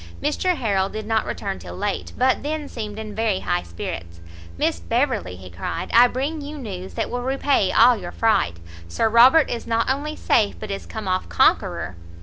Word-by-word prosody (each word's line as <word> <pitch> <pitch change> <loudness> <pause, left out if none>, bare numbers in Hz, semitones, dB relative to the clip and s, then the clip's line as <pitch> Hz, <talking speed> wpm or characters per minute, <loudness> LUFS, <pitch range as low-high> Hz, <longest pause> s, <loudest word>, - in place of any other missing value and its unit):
Mr 350 +5 0
Harrel 200 -8 0
did 215 +1 -6
not 220 0 0
return 195 -2 -4
till - - -9
late, 205 +1 -3
but 255 +1 +2
then 300 0 -3
seemed 215 -5 -6
in 215 -1 -6
very 215 -3 0
high 175 0 0
spirits: 85 0 -7 0.4
"Miss 85 - 0
Beverley," 85 +1 -1
he 90 0 -12
cried, 85 +2 -5
"I 240 +1 +8
bring 280 +6 -3
you 295 +1 -7
news 190 -8 -7
that - - -2
will 245 - -2
repay 265 -5 +1
all 245 +2 +6
your 180 -5 -7
fright; 205 - +1 0.3
Sir 225 - 0
Robert 255 +8 +7
is 235 - -4
not 230 0 +1
only 295 +3 -3
safe, 210 -8 +2
but 215 -2 -6
is 195 - -5
come 220 -3 -6
off 185 0 -1
conqueror." 90 - +2
220 Hz, 190 wpm, -22 LUFS, 190-260 Hz, 0.4 s, I